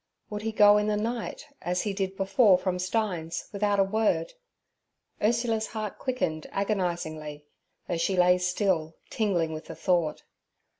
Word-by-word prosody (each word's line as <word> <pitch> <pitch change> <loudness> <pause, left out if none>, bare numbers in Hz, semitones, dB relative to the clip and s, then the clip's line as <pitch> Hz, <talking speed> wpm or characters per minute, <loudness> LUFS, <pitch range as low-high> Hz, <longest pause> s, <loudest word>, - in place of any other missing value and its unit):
Would 210 0 -4
he 225 +1 -2
go 210 -1 +6
in 210 - 0
the 210 0 +1
night, 230 +5 -3 0.2
as 180 +1 -1
he 205 - -2
did 195 -1 -3
before 195 0 +4
from 180 0 -2
Stein's, 180 -4 -2
without 205 0 +1
a - - +6
word? 220 - 0 0.9
Ursula's 225 0 +1
heart 215 -2 -5
quickened 170 - -2
agonizingly, 170 -7 -2 0.4
though 175 - -1
she 185 +3 0
lay 180 0 +5
still, 180 -3 0 0.2
tingling 175 -7 0
with 155 - -7
the - - -8
thought. 170 -5 0
195 Hz, 150 wpm, -27 LUFS, 175-215 Hz, 0.9 s, go